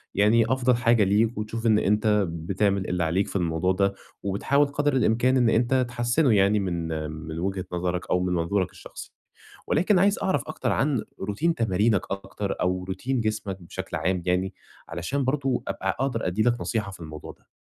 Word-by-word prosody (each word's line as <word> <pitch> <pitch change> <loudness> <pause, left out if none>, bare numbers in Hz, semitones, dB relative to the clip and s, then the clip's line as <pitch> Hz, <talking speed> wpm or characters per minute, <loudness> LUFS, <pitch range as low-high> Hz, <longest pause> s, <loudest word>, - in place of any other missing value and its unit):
يعني 110 +3 +4
أفضل 125 -1 +2
حاجة 115 -2 +3
ليك، 110 +4 +2
وتشوف 110 +2 -4
إن 110 -1 +4
أنتَ 105 +2 +1 0.2
بتعمل 95 +4 -1
اللي 90 -1 0
عليك 90 +5 +1
في - - -9
الموضوع 85 0 +1
ده، 100 +1 +1 0.3
وبتحاول 140 +9 +2
قدَر 145 0 0
الإمكان 125 +1 +3
إن 120 -2 +4
أنت 125 +3 +2
تحسِّنه 120 +2 +2
يعني، 100 +2 +4
من 85 -4 -2 0.2
من 80 +1 -7
وجهة 95 +1 -2
نظرَك 90 0 -2
أو 90 - +2
من 90 -1 0
منظورَك 90 +2 0
الشخصي. - - -11 0.6
ولكن 185 +1 +3
عايِز 200 +2 +3
أعرف 190 - +1
أكتر 155 - -2
عن 135 -5 +1 0.2
routine 160 +12 0
تمارينك 105 -1 +2
أكتر، 100 +1 -4
أو 90 0 0
routine 95 +8 -4
جسمك 110 -6 -2
بشكل 85 - -6
عام 95 -1 0
يعني، 90 +2 0 0.4
علشان 85 - -2
برضه 135 -1 0
أبقى 95 - -2
أقدَر 130 -7 -1
أدِّي 95 +5 0
لك 120 +1 +2
نصيحة 105 -4 -2
في 95 - -12
الموضوع 80 -2 -8
ده. - - -24
105 Hz, 175 wpm, -25 LUFS, 90-120 Hz, 0.6 s, يعني